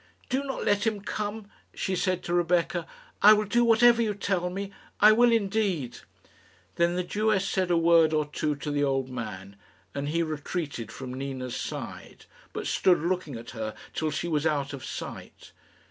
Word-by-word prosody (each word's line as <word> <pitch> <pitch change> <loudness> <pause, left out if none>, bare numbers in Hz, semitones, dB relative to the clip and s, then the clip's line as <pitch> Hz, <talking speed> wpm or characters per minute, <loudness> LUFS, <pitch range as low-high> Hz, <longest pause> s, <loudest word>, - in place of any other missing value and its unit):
"Do 265 +2 0
not 270 -2 -4
let 205 +2 +2
him 210 -2 -1
come," 210 +1 -4 0.3
she 190 - -1
said 185 0 0
to 175 - -3
Rebecca. 175 -1 +1 0.3
"I 210 - +9
will 210 0 +1
do 240 +4 +2
whatever 235 +1 +5
you 215 -3 0
tell 190 -3 -1
me; 195 +2 -5 0.3
I 215 - +8
will 240 +2 +5
indeed." 195 - 0 0.8
Then 170 +1 +2
the 180 - 0
Jewess 205 +1 +1
said 185 -1 0
a 175 - +3
word 165 -1 +5
or 155 -1 +1
two 150 0 -2
to 145 +1 -5
the 145 0 +1
old 135 -2 0
man, 100 -5 -7 0.4
and 140 +1 -3
he 165 +2 +1
retreated 150 -6 -4
from 125 0 -7
Nina's 130 -2 -5
side, - - -7 0.3
but - - -5
stood 180 -2 +3
looking 170 -4 -2
at 115 0 -8
her 110 -2 -5 0.2
till 155 - -1
she 155 - -3
was 155 -1 +1
out 145 -2 -1
of 135 - -7
sight. - - -8
170 Hz, 180 wpm, -27 LUFS, 145-205 Hz, 0.8 s, I